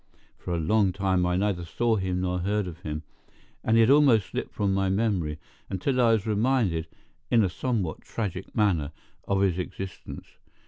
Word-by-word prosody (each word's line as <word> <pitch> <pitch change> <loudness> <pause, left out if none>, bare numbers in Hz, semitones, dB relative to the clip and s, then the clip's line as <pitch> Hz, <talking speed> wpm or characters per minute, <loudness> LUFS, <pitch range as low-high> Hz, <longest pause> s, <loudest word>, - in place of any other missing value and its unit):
For 90 - -3
a - - -1
long 100 +4 +2
time 95 -2 +1
I 90 - +1
neither 95 -3 0
saw 115 +7 0
him 95 -2 -1
nor 90 0 -1
heard 100 +3 0
of 85 -2 -8
him, 75 -2 -5 0.6
and 115 0 +3
he - - +7
had 115 +3 +5
almost 135 -8 +5
slipped - - -4
from 100 -2 0
my 95 0 +1
memory, 95 -7 0 0.3
until 125 +7 0
I 115 -2 +5
was 110 -2 0
reminded, 105 -7 +1 0.4
in 115 -2 +4
a 95 - +1
somewhat 100 -5 -2
tragic 95 -5 -5
manner, 85 -9 +1 0.3
of 100 -1 +1
his 95 -2 +2
existence. 95 +1 -7
95 Hz, 180 wpm, -26 LUFS, 90-110 Hz, 0.6 s, he